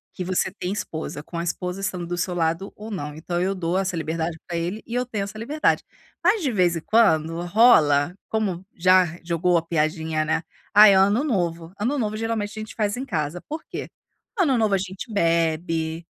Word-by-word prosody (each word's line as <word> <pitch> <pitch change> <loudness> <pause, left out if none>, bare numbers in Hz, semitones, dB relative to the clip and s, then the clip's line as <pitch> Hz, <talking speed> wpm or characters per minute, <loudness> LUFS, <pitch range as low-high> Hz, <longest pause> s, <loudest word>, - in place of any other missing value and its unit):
Que 185 - -3
você 185 +1 0
tem 185 -1 -4
esposa. 160 -6 -5
Com 170 +1 -6
a - - -2
esposa 180 +2 -3
estando 180 -3 -3
do 175 - -2
seu 180 0 -2
lado 165 +3 -1
ou 215 +1 -9
não", 150 -6 -5
então, 175 +2 -3
eu 195 +2 0
dou 175 0 -1
essa 190 -2 -1
liberdade 160 +1 -2
pra 175 - -4
ele 175 +6 -3
e 230 - -7
eu 250 0 +1
tenho 210 -5 -2
essa 200 +2 -9
liberdade. 300 +7 +1 0.4
Mas, 390 +4 +3
de 265 - +1
vez 180 -4 +2
em - - -5
quando 165 -7 +3
rola, 175 -8 +5 0.2
como, 195 -5 -1
já, 185 +1 +5 0.2
jogou 170 +1 +2
a 165 - -2
piadinha 160 -1 0
né: 160 +2 0 0.3
"Ai 210 -1 +9
é - - +4
ano 200 +8 +4
novo". 170 - -2
Ano 250 +8 0
novo 215 -2 -1
geralmente 225 -2 -2
a - - -3
gente 215 - -9
faz 210 -1 0
em 265 - -4
casa, 160 - -3
por 315 +2 -5
quê? - - -6 0.5
Ano 280 -8 +3
novo 215 -3 +2
a 195 - +1
gente 190 +4 -6
bebe, 165 -2 0
180 Hz, 210 wpm, -24 LUFS, 165-210 Hz, 0.5 s, Ai